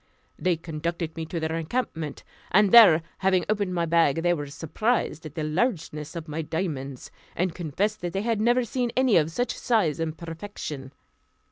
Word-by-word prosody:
They 180 -1 +2
conducted 165 +1 -4
me 160 -1 -5
to 170 - -3
their 160 0 -2
encampment; 165 - -3 0.3
and 205 +1 +4
there 190 -9 +9 0.2
having 185 -1 +2
opened 205 -3 0
my 170 -1 +1
bag, 165 -2 +3
they 175 0 +3
were 145 -4 -4
surprised 160 - -1
at 150 - -13
the 155 - -2
largeness 155 - -2
of 165 -1 -6
my 155 +1 -3
diamonds, 150 -5 -4 0.2
and 180 0 0
confessed 185 +6 -2
that 175 -1 -3
they 195 - -1
had 225 -2 0
never 240 +2 +3
seen 245 +1 -1
any 260 -4 +4
of 155 -1 +3
such 245 +9 -2
size 200 - +1
and 160 -1 -2
perfection. 165 -5 -7
170 Hz, 175 wpm, -26 LUFS, 155-205 Hz, 0.3 s, there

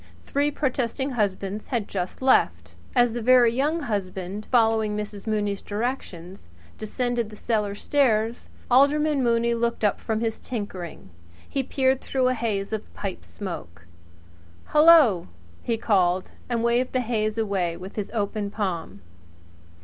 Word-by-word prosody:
Three 285 +1 +1
protesting 265 -1 -1
husbands 205 -2 -2
had 235 -6 -2
just 185 +5 -4
left. 265 - +2 0.2
As 245 -2 +4
the 240 - -3
Very 240 0 +5
Young 300 +6 0
Husband, 200 -3 -4
following 225 -3 +2
Mrs. 210 0 -6
Mooney's 205 -2 -1
directions, 200 - -5
cautiously 85 0 -25
descended 240 +1 -2
the 215 - -11
cellar 210 -2 -1
stairs, 230 -3 +1 0.2
Alderman 285 +3 +4
Mooney 235 -1 +2
looked 235 -1 -1
up 205 - +1
from 220 -1 -1
his 225 -1 -2
tinkering. 185 - -6 0.4
He 275 - -1
peered 265 0 +1
through 260 -1 +1
a - - +2
haze 215 -4 -2
of 215 - -5
pipe 195 -3 -5
smoke. 85 - -8 0.9
"Hello!" 300 - +6 0.3
he 230 -1 -1
called, 185 -4 +1 0.2
and 235 -2 0
waved 240 +2 +1
the 255 - +2
haze 215 -2 -1
away 190 -6 -1
with 185 +2 -9
his 210 -2 -3
open 210 -2 -2
palm. 175 - -4
220 Hz, 140 wpm, -25 LUFS, 200-245 Hz, 0.9 s, Hello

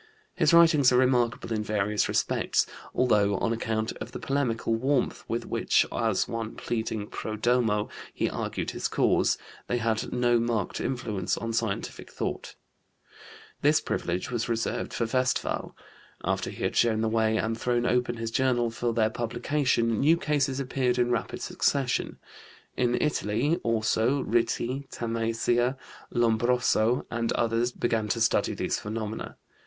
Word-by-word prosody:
His - - +3
writings 165 -6 +6
are 125 - +4
remarkable 125 -3 +2
in 110 - 0
various 105 0 0
respects, - - +1 0.3
although, 105 -5 +2
on 115 - 0
account 110 0 -1
of - - -8
the - - -5
polemical 125 -5 -1
warmth 130 +3 0
with - - -2
which, - - +2
as 110 -4 0
one 115 -1 -4
pleading 110 -2 -3
pro 110 +1 -5
domo, 110 -2 +1 0.2
he - - -1
argued - - -3
his - - -2
cause, - - +2 0.3
they 120 - 0
had 115 -2 -1
no 120 -1 +2
marked 115 -4 -1
influence 110 -8 -2
on 115 0 -3
scientific 110 -3 -3
thought. - - -4 1.1
This 150 +2 +4
privilege 90 +7 -3
was 120 0 -2
reserved 115 0 -1
for 115 - -1
Westphal. 130 +2 -1 0.5
After - - -1
he - - -7
had - - -1
shown 110 -2 +3
the 110 - +1
way 110 0 +2
and 110 +1 -1
thrown 120 +1 0
open 125 -1 +1
his 115 0 -4
journal 120 -2 +1
for 120 0 -1
their 110 -2 +2
publication, 120 0 0
new 160 +4 +4
cases 145 -4 0
appeared 130 -2 0
in 120 0 +2
rapid 120 - -2
succession. 135 -3 0 0.6
In 125 -1 +1
Italy, 145 +1 +1
also, 115 0 +1
Ritti, 120 +4 -1
Tamassia, 115 +2 0 0.3
Lombroso, 120 0 +2
and 115 -1 -1
others 115 +1 +1
began 115 -3 -1
to 115 - -1
study 110 0 +2
these - - -1
phenomena. 110 +1 -5
115 Hz, 145 wpm, -27 LUFS, 110-125 Hz, 1.1 s, writings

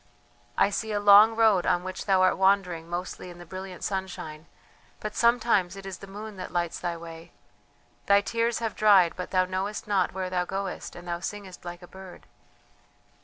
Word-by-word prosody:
I 200 - +3
see 220 +2 -3
a 205 - 0
long 205 +2 +7
road 220 -5 +3
on 175 - +2
which 185 +2 -6
thou 190 -1 +4
art 185 - +4
wandering 190 -4 +1
mostly 180 +1 -5
in 175 - -11
the 175 - -11
brilliant 185 +1 -8
sunshine, 180 -5 -5 0.5
but 210 0 -5
sometimes 230 -6 +2
it 195 0 -10
is 190 -1 -7
the 195 - -10
moon 210 +1 -9
that 185 - -6
lights 175 -1 -2
thy 175 -1 -3
way. 165 0 -11 0.7
Thy 200 0 +5
tears 230 +2 -1
have 225 -2 -3
dried, 195 -5 +5
but 180 - -6
thou 185 -1 +2
knowest 190 +4 -4
not 195 -4 +1
where 185 -1 -4
thou 180 -1 +1
goest 195 +1 -5
and 175 0 -11
thou 170 0 -3
singest 190 -1 -7
like 175 +1 -8
a - - -11
bird. 190 0 -12
190 Hz, 190 wpm, -27 LUFS, 175-205 Hz, 0.7 s, long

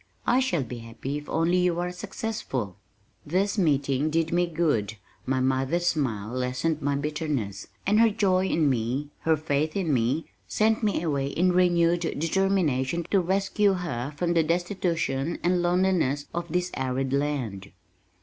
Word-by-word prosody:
I 250 - +4
shall 180 - +1
be 120 0 -7
happy 120 +5 -5
if 150 - -13
only 165 +3 +2
you 180 -1 +1
are 180 0 -2
successful." 180 - -4 0.5
This 190 +6 0
meeting 140 -3 +1
did 165 +1 0
me 175 0 +2
good. 150 - 0 0.3
My 130 0 +1
mother's 135 +6 +1
smile 120 -12 0
lessened 130 +5 -1
my 145 0 0
bitterness, 140 -9 -3 0.2
and 210 +3 +3
her 230 0 +6
joy 190 -3 +2
in 160 -5 +2
me, 130 +3 -1
her 160 -1 +2
faith 155 0 -1
in 170 -6 0
me, 130 +6 +1 0.2
sent 220 +1 +2
me 205 -6 0
away 140 -4 0
in 180 +6 +2
renewed 175 -1 +3 0.2
determination 165 -3 +1
to 200 - +5
rescue 195 +3 +2
her 150 -8 -3
from 175 -1 0
the 165 - +4
destitution 170 -3 -1
and 175 +1 +2
loneliness 175 -5 +1
of 170 0 -3
this 180 +1 0
arid 130 0 -2
land. 130 -9 -2
160 Hz, 155 wpm, -26 LUFS, 135-180 Hz, 0.5 s, her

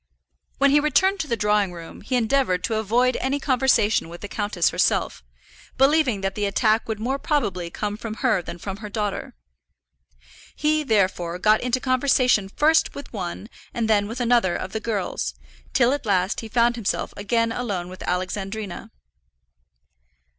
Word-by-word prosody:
When 280 0 +4
he 295 - +5
returned 380 +7 +2
to 315 - -2
the 235 - -1
drawing 210 -2 +2
room 170 -1 -10
he 255 - -2
endeavoured 235 -6 +1
to 225 - -1
avoid 240 +4 +2
any 270 +2 -1
conversation 255 - +2
with 170 +1 -10
the 205 - -5
countess 205 -4 0
herself, - - 0 0.5
believing 270 -6 +3
that 195 0 -1
the 205 +1 -2
attack 215 +2 +2
would 220 -1 -2
more 260 +5 -2
probably 195 - -1
come 210 +4 -4
from 220 -1 -6
her 225 -7 +1
than 170 - -8
from 195 +2 -6
her 210 0 -8
daughter. 205 - -3 1.2
He, 305 +1 +1
therefore, 190 - 0
got 215 +3 +3
into 250 +1 0
conversation 255 -5 +2
first 315 +9 +2
with 280 - -9
one 190 0 -5 0.3
and 230 -2 0
then 205 -2 +2
with 230 +4 -6
another 235 -7 +2
of 185 - -5
the 220 - -3
girls, 200 - -3 0.4
till 250 - +3
at 285 -5 -4
last 190 0 +1
he 225 - -6
found 235 +1 +2
himself 220 -5 -2
again 230 +3 0
alone 205 -8 -3
with 185 +1 -11
Alexandrina. 195 +2 -4
220 Hz, 165 wpm, -23 LUFS, 195-255 Hz, 1.2 s, he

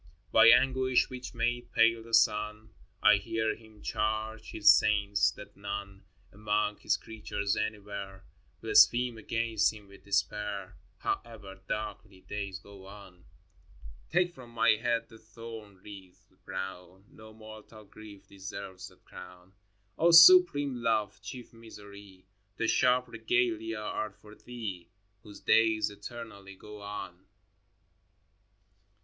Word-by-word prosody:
XIX. - - -29
By - - +7
anguish 130 -1 +4
which 130 -1 -8
made 120 +1 -2
pale 115 0 +3
the 115 0 0
sun, 105 -1 +1 0.3
I 105 - +7
hear 110 +1 -2
Him 110 -2 -18
charge 110 0 -3
His 105 -1 -4
saints 100 -1 +5
that 105 - -13
none 100 -1 -7 0.3
Among 105 0 -1
His - - 0
creatures 105 -2 -4
anywhere 100 -2 -5 0.4
Blaspheme 120 -1 +4
against 115 -1 0
Him 105 -2 -14
with 100 - -17
despair, 100 -1 -2 0.2
However 100 -5 -5
darkly 105 -2 -6
days 100 -2 -6
go 95 -1 -15
on. 95 -3 -14
xx. 85 -7 -21
Take 175 +1 +1
from 130 -6 -13
my 115 +2 +1
head 115 +1 0
the 110 -2 -16
thorn 110 -2 -11
wreath 95 -3 -14
brown! 95 0 -7
No 110 0 -15
mortal 110 0 -13
grief 100 -1 -14
deserves 95 -1 -9
that - - -20
crown. 90 +1 -13 0.5
O 170 - +4
supreme 165 -5 +7
Love, 105 -4 -1
chief 125 -2 -10
Misery, 100 -4 -14 0.3
The 115 - -1
sharp 125 +2 +2
regalia 115 -1 -1
are 105 0 -4
for 105 +2 -17
Thee 105 -8 -8 0.3
Whose 105 0 -13
days 110 -2 +3
eternally 100 -2 -10
go 105 +2 -12
on 100 -2 -8
105 Hz, 125 wpm, -29 LUFS, 100-115 Hz, 0.5 s, By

